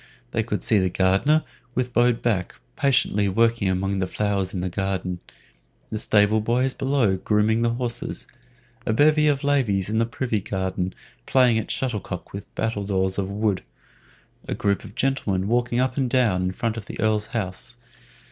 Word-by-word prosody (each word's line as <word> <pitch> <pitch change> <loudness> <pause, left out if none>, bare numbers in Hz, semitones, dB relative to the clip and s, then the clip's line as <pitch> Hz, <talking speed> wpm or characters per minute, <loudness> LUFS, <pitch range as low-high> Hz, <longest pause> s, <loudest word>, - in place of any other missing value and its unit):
They - - +1
could - - -3
see 110 - +3
the 95 -1 +1
gardener, 95 - +3 0.3
with 125 -1 -1
bowed 120 0 +3
back, 100 -7 0 0.2
patiently 125 -7 +2
working 115 0 +2
among 95 +1 0
the 95 - 0
flowers 100 -2 -1
in 90 - -3
the 90 - -1
garden, 95 -1 -2 0.7
the 110 - -2
stable 105 0 +3
boys 125 +4 +1
below 130 -8 +1
grooming 105 +3 +2
the 115 0 +1
horses, 120 -1 -2 0.6
a 110 - 0
bevy 150 +4 +4
of 145 -1 +1
ladies 110 -9 +1
in 110 - +1
the 115 - +2
privy 115 -3 -2
garden 95 -1 -2 0.3
playing 125 -4 +4
at - - -5
shuttlecock 105 -8 -3
with 100 +1 -7
battledoors 100 -4 -1
of 95 -1 -2
wood, 100 -1 0 0.9
a - - -2
group 100 -1 0
of - - -11
gentlemen 100 -8 0
walking 120 +1 +1
up 130 +1 0
and 130 -3 +1
down 115 -8 +2
in 90 0 0
front 115 +3 -2
of 105 - -7
the - - -8
Earl's 110 -1 +1
house. 110 0 -4
110 Hz, 170 wpm, -24 LUFS, 95-120 Hz, 0.9 s, bevy